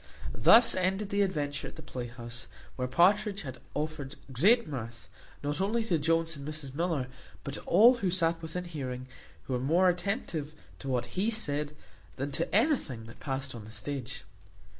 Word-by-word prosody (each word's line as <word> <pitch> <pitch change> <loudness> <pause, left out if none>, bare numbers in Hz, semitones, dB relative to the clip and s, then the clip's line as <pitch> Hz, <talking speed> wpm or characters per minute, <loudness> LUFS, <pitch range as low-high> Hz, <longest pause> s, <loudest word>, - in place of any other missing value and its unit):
Thus 230 +1 +7
ended 190 +2 0
the 200 0 +2
adventure 145 -7 -1
at - - -10
the - - -10
playhouse; 120 -1 -6 0.3
where 125 -1 -2
Partridge 200 - +3
had 130 -3 -7 0.2
afforded 150 -2 -3 0.2
great 210 - +4
mirth, 120 -5 -6 0.4
not 145 +4 -1
only 220 +4 +1
to 175 -7 +1
Jones 165 +2 +1
and 140 0 -8
Mrs 150 -3 -5
Miller, 165 -3 0 0.4
but 140 - -5
to - - -5
all 240 +4 +7
who 195 -5 0
sat 165 -2 +1
within 165 +2 -4
hearing, 130 -7 -5 0.4
who 130 - -4
were 125 - +1
more 170 +8 +4
attentive 175 - -2 0.2
to 135 - -8
what 125 -2 0
he 210 +4 +3
said, 150 -9 -1 0.4
than 140 +2 -3
to 140 - -1
anything 205 - +1
that 115 - -13
passed 135 -1 -3
on 115 -3 -8
the 110 - -11
stage. 130 +1 -5
150 Hz, 175 wpm, -30 LUFS, 130-185 Hz, 0.4 s, Thus